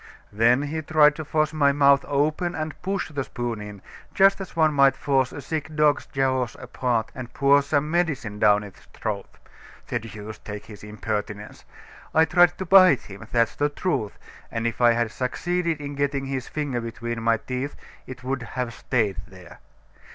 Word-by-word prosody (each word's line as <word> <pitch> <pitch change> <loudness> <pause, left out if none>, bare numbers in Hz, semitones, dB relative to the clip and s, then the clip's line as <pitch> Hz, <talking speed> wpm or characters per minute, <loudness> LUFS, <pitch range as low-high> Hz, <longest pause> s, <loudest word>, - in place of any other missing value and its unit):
Then 120 +6 +3
he 155 +2 -3
tried 150 -1 +5
to 155 - -4
force 155 0 0
my 145 -2 +3
mouth 140 -1 +4
open 155 +5 0
and 155 -1 -5
push 195 0 -2
the 145 -3 -3
spoon 120 -4 -4
in, 105 -1 -9 0.3
just 195 0 +5
as 190 - -8
one 155 -2 +3
might 140 -2 +5
force 135 -3 +1
a 145 - -8
sick 155 +2 -4
dog's 150 -1 +2
jaws 130 -3 -1
apart 120 -2 -2
and 125 -2 -8
pour 140 +1 +5
some 145 +1 -1
medicine 150 -12 -1
down 105 -1 +4
its 100 -2 -12
throat. - - -4 0.6
The 120 - -1
deuce 110 -1 -9
take 105 -1 -8
his 105 -2 -12
impertinence! 105 0 -5 0.5
I 160 +1 +6
tried 175 +1 +4
to 190 - -4
bite 185 -6 +7
him: 100 +3 -11
that's 115 -2 +2
the 145 0 +1
truth, 140 - -2 0.3
and 115 0 -3
if 115 +1 -2
I 120 -1 +6
had 115 -1 -1
succeeded 170 +6 -2
in 145 -1 -6
getting 140 -1 -1
his 135 -2 -4
finger 140 -5 -3
between 115 0 -5
my 115 0 +2
teeth, 130 +5 -5 0.3
it 125 -2 -9
would 130 0 -2 0.2
have 125 -2 -2
stayed 110 -8 -1
there. 90 -3 -14
135 Hz, 180 wpm, -24 LUFS, 115-150 Hz, 0.6 s, bite